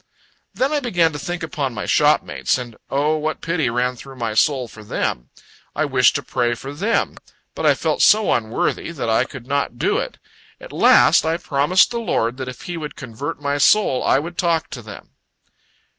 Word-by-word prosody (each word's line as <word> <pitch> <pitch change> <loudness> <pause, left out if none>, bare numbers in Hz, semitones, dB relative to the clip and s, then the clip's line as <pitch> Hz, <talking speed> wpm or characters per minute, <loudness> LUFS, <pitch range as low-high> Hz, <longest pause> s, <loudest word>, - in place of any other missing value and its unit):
Then 265 +3 +1
I 295 - +2
began 175 - +1
to 145 - -5
think 175 +3 -5
upon 140 -6 -3
my 105 - -4
shopmates 65 +1 +2
and, 120 -3 -7
O 150 +3 +1
what 155 +1 -3
pity 165 -6 -1
ran 125 +2 0
through 135 +2 -12
my 115 -3 -3
soul 130 +2 +2
for 110 -1 -13
them. - - -3 0.5
I 155 - +1
wished 130 -3 +3
to - - -2
pray 120 -2 0
for 135 +4 -8
them; 205 +10 -1 0.4
but - - -1
I - - +5
felt - - -1
so 215 0 +5
unworthy, 110 +6 -1
that 130 -8 -3
I 110 - +3
could 130 -5 -10
not 140 -3 -2
do - - +1
it. - - -5 0.4
At - - -11
last - - +5
I 160 +1 0
promised 150 +6 +2
the 235 - -2
Lord 120 - -1
that 130 -1 -5
if 130 - -10
He 175 -1 -5
would 150 -2 -6
convert 130 +3 -6
my 140 0 0
soul, 145 -4 +3
I - - +3
would 170 +5 -5
talk 170 -2 0
to 125 - -7
them. 110 -2 -12
140 Hz, 200 wpm, -20 LUFS, 120-165 Hz, 0.5 s, I